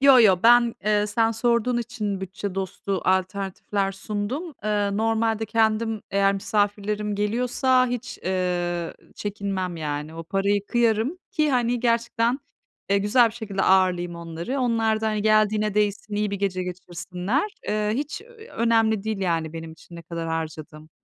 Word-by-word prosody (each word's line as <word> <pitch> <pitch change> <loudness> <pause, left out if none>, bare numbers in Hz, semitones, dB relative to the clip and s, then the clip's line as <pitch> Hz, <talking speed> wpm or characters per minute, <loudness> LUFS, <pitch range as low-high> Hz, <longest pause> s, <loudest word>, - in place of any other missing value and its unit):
Yo 275 -1 +8
yo. 190 -5 +5
Ben, 240 0 +6
eee, 210 0 +2
sen 225 +1 +2
sorduğun 235 +1 +1
için 215 -4 -3
bütçe 190 +1 -5
dostu 195 0 -3
alternatifler 195 +1 0
sundum. 215 - -4
Eee, 205 -1 0
normalde 225 0 +1
kendim 220 0 +1
eğer 195 0 +3
misafirlerim 205 +1 -1
geliyorsa 250 +5 +2
hiç, 245 -1 -4
eee, 175 -2 -1 0.2
çekinmem, 195 -4 -3
yani. 150 0 -4
O 165 0 -7
paraya 200 +3 +1
kıyarım 240 +6 +1
ki 305 -6 +1
hani 245 -2 +1
gerçekten, 235 +1 +1 0.5
eee, 200 - +4
güzel 220 +4 +4
bir 225 - -11
şekilde 200 -4 -3
ağırlayayım 180 -2 +3
onları. 170 +9 -4
Onlar 225 -3 +1
da, 220 - -1
hani, 215 -1 -1
geldiğine 215 -1 +3
değsin, 210 0 0
iyi 210 0 0
bir 200 - -2
gece 185 -2 -1
geçirsinler. 180 - -3 0.2
Eee, 210 0 0
hiç 290 - -3
ö 475 +2 -18
eee, 450 - -12
önemli 225 -3 +2
değil, 220 -2 -2
yani, 165 -4 0
benim 165 -1 -7
için 170 +1 -14
ne 170 - -9
kadar 165 0 -5
harcadığım. 155 -1 -5
210 Hz, 155 wpm, -24 LUFS, 185-230 Hz, 0.5 s, Yo